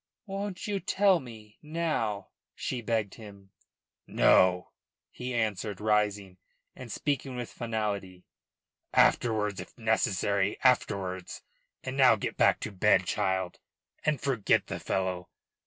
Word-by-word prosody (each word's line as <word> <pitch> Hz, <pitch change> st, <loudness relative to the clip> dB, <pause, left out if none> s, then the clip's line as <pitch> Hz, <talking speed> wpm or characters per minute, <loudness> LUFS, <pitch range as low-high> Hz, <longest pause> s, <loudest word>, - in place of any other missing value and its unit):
"Won't 195 Hz, -1 st, -5 dB
you 205 Hz, -2 st, -1 dB
tell 190 Hz, -1 st, +3 dB
me 110 Hz, -5 st, -12 dB
now?" 150 Hz, -, -2 dB, 0.3 s
she 125 Hz, -, -3 dB
begged 110 Hz, -3 st, -1 dB
him. 100 Hz, -3 st, -13 dB, 0.6 s
"No," 90 Hz, -1 st, +4 dB, 0.4 s
he 125 Hz, +1 st, -6 dB
answered, 105 Hz, -3 st, -1 dB
rising, 105 Hz, -3 st, 0 dB, 0.4 s
and 125 Hz, -3 st, -9 dB
speaking 135 Hz, -1 st, -2 dB
with 120 Hz, -1 st, -5 dB
finality. 105 Hz, -6 st, -4 dB, 0.7 s
"Afterwards 105 Hz, -4 st, +3 dB
if -, -, -10 dB
necessary, 100 Hz, -3 st, +1 dB
afterwards. 95 Hz, -8 st, 0 dB, 0.4 s
And 130 Hz, +1 st, -5 dB
now 130 Hz, -4 st, +7 dB
get 105 Hz, -, -4 dB
back -, -, +4 dB
to 105 Hz, -, -4 dB
bed, 95 Hz, -1 st, +3 dB
child, 95 Hz, 0 st, -1 dB, 0.4 s
and 150 Hz, -3 st, +1 dB
forget 125 Hz, -7 st, +1 dB
the -, -, -5 dB
fellow. 90 Hz, -1 st, -2 dB
105 Hz, 120 wpm, -29 LUFS, 95-125 Hz, 0.7 s, now